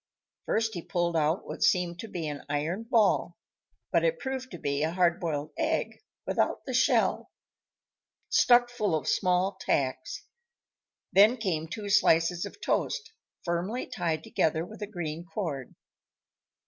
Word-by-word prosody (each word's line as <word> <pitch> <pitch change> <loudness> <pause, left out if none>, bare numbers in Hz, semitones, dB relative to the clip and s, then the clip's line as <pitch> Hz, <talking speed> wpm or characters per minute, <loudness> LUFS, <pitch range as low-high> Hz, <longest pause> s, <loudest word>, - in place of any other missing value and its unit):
First 225 0 +1
he 175 - -4
pulled 175 -1 -1
out 155 +2 +1
what - - -7
seemed 175 -2 +2
to 225 - -6
be 170 -6 -4
an 145 -1 -5
iron 160 +9 -2
ball; 225 -3 +2 0.5
but - - +3
it - - +2
proved 265 - -4
to 175 - -8
be 140 -2 -1
a 155 - +2
hard 175 -2 +2
boiled 155 -3 -3
egg, 320 0 -1 0.2
without - - 0
the - - -4
shell, - - +2 1.0
stuck 245 0 +5
full 210 -8 0
of 155 - -3
small 185 +1 +1
tacks. 130 -2 -1 0.9
Then 210 +6 +6
came 170 -8 -2
two 205 +6 -6
slices 175 -1 +3
of 200 - -13
toast, 460 +1 -1 0.3
firmly 180 +8 -1
tied 160 -3 -2
together 160 +1 0
with 215 +3 -12
a 210 - -3
green 170 -5 -5
cord. 160 -6 -5
175 Hz, 150 wpm, -28 LUFS, 160-215 Hz, 1.0 s, Then